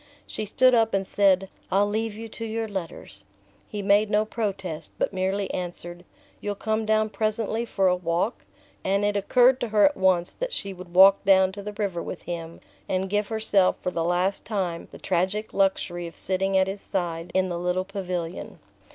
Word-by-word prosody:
She 215 - -4
stood 255 +5 +4
up 225 -3 +3
and 195 0 0
said: 195 -1 +3 0.2
"I'll 200 +2 +4
leave 220 +1 -2
you 225 +1 -7
to 230 - -7
your 225 0 -2
letters." 165 - -7 0.4
He 205 -1 -5
made 205 +1 +4
no 210 0 +2
protest, 195 -8 -4
but - - -1
merely 190 +1 -1
answered: 175 -1 -6 0.4
"You'll 205 0 -3
come 220 +1 -1
down 215 0 +2
presently 220 +2 -1
for 195 -4 0
a 180 - +4
walk?" 180 +5 -1 0.4
and 195 +2 +1
it 205 0 +1
occurred 250 +6 +4
to 240 - -2
her 210 -1 +4
at 290 - +3
once 185 -2 +2
that - - -4
she 195 -1 -4
would 180 -1 -12
walk 195 +1 +7
down 190 -1 +5
to 200 +1 -8
the 210 +1 -6
river 200 -5 -2
with 180 - -7
him, 165 -1 -6 0.3
and 190 0 -1
give 205 0 +1
herself 215 -4 +2
for 180 - -1
the 165 -2 -1
last 180 +3 0
time 185 -6 -3
the - - -11
tragic 190 +4 -1
luxury 180 -3 0
of 165 - -12
sitting 190 +1 0
at 190 - +4
his 195 +1 -5
side 175 -3 -3
in 185 0 +2
the 175 -1 -3
little 180 +1 -1
pavilion. 185 -3 -5
195 Hz, 195 wpm, -25 LUFS, 180-210 Hz, 0.4 s, walk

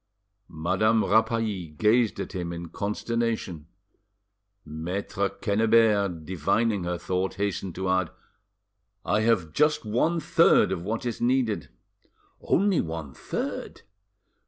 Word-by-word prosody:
Madame 95 +7 +2
Rapally 110 -5 +1
gazed 110 +3 +3
at - - -4
him 90 -3 -4
in 85 0 -6
consternation. 105 -5 -3 1.0
Maitre 90 +5 -3
Quennebert, 105 -5 +2
divining 95 +4 0
her 90 0 -2
thought, 95 +2 -2
hastened 100 -3 -3
to 95 +1 -3
add— 95 -2 +1 1.0
"I 105 - +2
have 105 -9 +1
just 150 - +2
one 140 +11 +1
third 170 +1 +4
of 95 -3 -2
what 110 +7 -3
is 120 -2 -3
needed." 120 -3 +1 0.7
"Only 195 -1 +2
one 80 -4 -6
third?" - - -5
100 Hz, 110 wpm, -26 LUFS, 90-115 Hz, 1.0 s, third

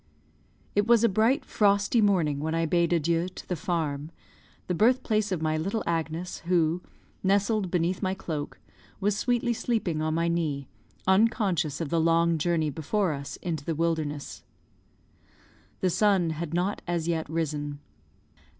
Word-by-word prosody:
It 205 +1 +2
was 235 -1 +5
a - - +6
bright 225 +6 +2
frosty 200 +2 +2
morning 170 -9 +2
when 160 +2 -2
I 165 0 +1
bade 170 +1 +2
adieu 170 +1 +1
to 185 - -11
the 180 - -1
farm, 155 -3 -2 0.6
the 180 - -1
birthplace 215 0 +2
of 170 -4 -1
my 155 0 +1
little 195 +8 -2
Agnes, 165 +2 -2
who, 170 -1 +2 0.4
nestled 200 +1 +1
beneath 175 +1 0
my 190 -1 0
cloak, 155 -6 -5 0.4
was 205 0 +1
sweetly 240 +2 +1
sleeping 215 -9 -1
on 155 0 0
my 165 +1 +1
knee, 155 -5 -1 0.4
unconscious 190 - +2
of 160 - -3
the 165 +1 +2
long 165 0 +3
journey 160 -1 +1
before 165 +4 0
us 140 0 -6
into 160 -5 -3
the 165 +2 -2
wilderness. 155 -3 -2 1.4
The 185 - +2
sun 185 -3 +3
had 160 0 -4
not 180 +4 -1
as 170 -2 -1
yet 160 -3 -1
risen. 150 -3 -2
170 Hz, 150 wpm, -27 LUFS, 160-200 Hz, 1.4 s, a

